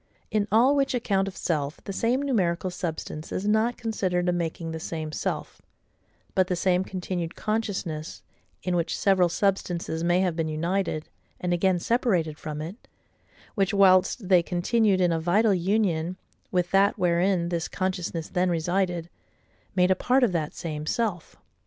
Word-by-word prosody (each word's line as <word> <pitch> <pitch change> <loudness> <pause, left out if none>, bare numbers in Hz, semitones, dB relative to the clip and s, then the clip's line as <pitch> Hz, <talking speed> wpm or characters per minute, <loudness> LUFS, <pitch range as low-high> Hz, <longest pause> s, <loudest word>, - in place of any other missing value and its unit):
In 210 -1 +1
all 245 +6 +5
which 275 -2 +1
account 195 -5 +1
of 195 - -7
self, 150 -3 -2
the 195 - -5
same 240 +7 +1
numerical 185 -9 0
SUBSTANCE 165 -3 -5
is 195 - -2
not 220 +3 +2
considered 185 -6 -1
a - - +4
making 165 -1 -3
the 160 - -5
same 160 -1 -4
self; - - -4 0.7
but 185 -1 +3
the 180 - 0
same 180 +1 +2
continued 180 -3 -4
CONSCIOUSNESS, 195 -8 -3 0.4
in 180 -1 0
which 170 -1 0
several 190 -3 +3
substances 175 -3 -1
may 175 +1 +3
have 180 -3 0
been 165 -1 -1
united, 160 +1 -1 0.3
and 180 -1 -1
again 185 +1 +2
separated 175 -7 0
from 155 -1 -5
it, 180 +9 -9 0.7
which, 195 -1 +1
whilst 190 +2 +4
they 180 -2 +6
continued 190 +3 +1
in 175 -1 +3
a 165 - +1
vital 200 +6 +3
union 185 -2 0 0.3
with 180 -2 0
that 200 +3 +4
wherein 175 -1 +2
this 170 -1 -2
consciousness 180 -3 -3
then 180 0 0
resided, 175 0 0 0.7
made 180 0 +4
a - - +5
part 255 +7 +2
of 235 - +3
that 160 -4 -2
same 155 -2 -5
self. 205 -7 -2
180 Hz, 160 wpm, -26 LUFS, 170-200 Hz, 0.7 s, they